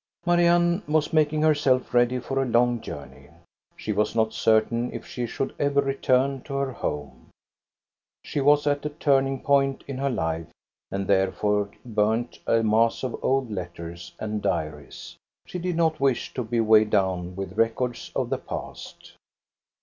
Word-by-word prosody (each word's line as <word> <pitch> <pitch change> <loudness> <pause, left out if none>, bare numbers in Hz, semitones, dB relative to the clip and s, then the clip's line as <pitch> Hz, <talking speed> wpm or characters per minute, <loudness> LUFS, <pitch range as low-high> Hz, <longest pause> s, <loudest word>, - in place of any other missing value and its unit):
Marianne 175 +1 +3
was 155 +1 +1
making 155 -1 +2
herself 145 -5 +2
ready 120 +1 +3
for 135 +2 -2
a - - 0
long 120 0 +2
jour 70 -8 -7
ney. - - -17 0.5
She - - -4
was 105 +2 0
not 110 -1 +1
certain 115 +2 +2
if - - -7
she 120 -1 -4
should 135 - -3
ever 140 0 +2
return 135 -1 +1
to 140 - -7
^er 140 -1 -1
home. 70 - -5 0.9
She 145 - -2
was 145 +1 +4
at 145 -1 +1
a 150 - -2
turning 135 -3 +1
point 135 -1 +2
in 135 -2 -5
her 140 0 0
life 80 - -2 0.4
and 100 0 -3
therefore 100 +2 +1 0.2
burned 110 +1 0
a 115 0 +3
mass 115 +3 +2
of 130 - -2
old 135 -3 +1
letters 85 -3 -7
and 105 -1 -3
diaries. 75 -6 -4 0.3
She 180 - -6
did 180 0 -2
not 160 -2 +1
wish 135 -3 0
to 125 - -2
be 115 +1 -1
weighed 110 -1 +5
down 90 -3 0
with 95 0 -6
records 115 +2 -1
of - - -1
the - - 0
past. - - -8
120 Hz, 165 wpm, -25 LUFS, 105-140 Hz, 0.9 s, weighed